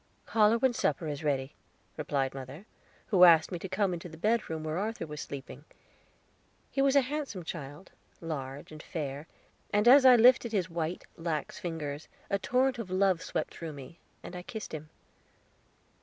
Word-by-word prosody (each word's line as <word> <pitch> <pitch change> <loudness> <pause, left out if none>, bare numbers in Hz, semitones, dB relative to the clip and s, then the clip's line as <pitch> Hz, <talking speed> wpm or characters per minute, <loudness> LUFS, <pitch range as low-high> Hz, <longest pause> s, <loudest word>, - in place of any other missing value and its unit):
"Call 215 -2 +4
her 230 - +3
when 255 +1 +2
supper 160 - 0
is 145 0 -4
ready," 140 -2 -1 0.4
replied 140 -3 -1
mother, 135 +7 -9 0.4
who 190 -6 +5
asked 165 -1 +7
me 175 - -3
to 190 - -6
come 190 0 +1
into 175 0 -6
the 160 - -11
bedroom 195 -5 0
where 155 +2 -2
Arthur 220 -1 -3
was 150 -1 -7
sleeping. 140 0 -8 1.1
He 275 - 0
was 275 0 +3
a 280 - +7
handsome 270 - -4
child, 150 +1 -8 0.3
large 145 -4 -6
and 155 -1 -9
fair, 145 -2 -5 0.4
and 210 +2 +2
as 265 +2 +9
I 255 -1 +9
lifted 235 0 +5
his 185 -4 0
white, 165 +1 -3
lax 165 +2 -3
fingers, 160 -5 -5 0.2
a 200 - +2
torrent 255 +4 +1
of 215 -5 -5
love 185 -2 +2
swept - - -3
through 165 -2 -7
me, 140 +4 -11 0.2
and 180 - -8
I 180 - -5
kissed 215 +2 -7
him. 155 0 -7
170 Hz, 175 wpm, -30 LUFS, 150-215 Hz, 1.1 s, as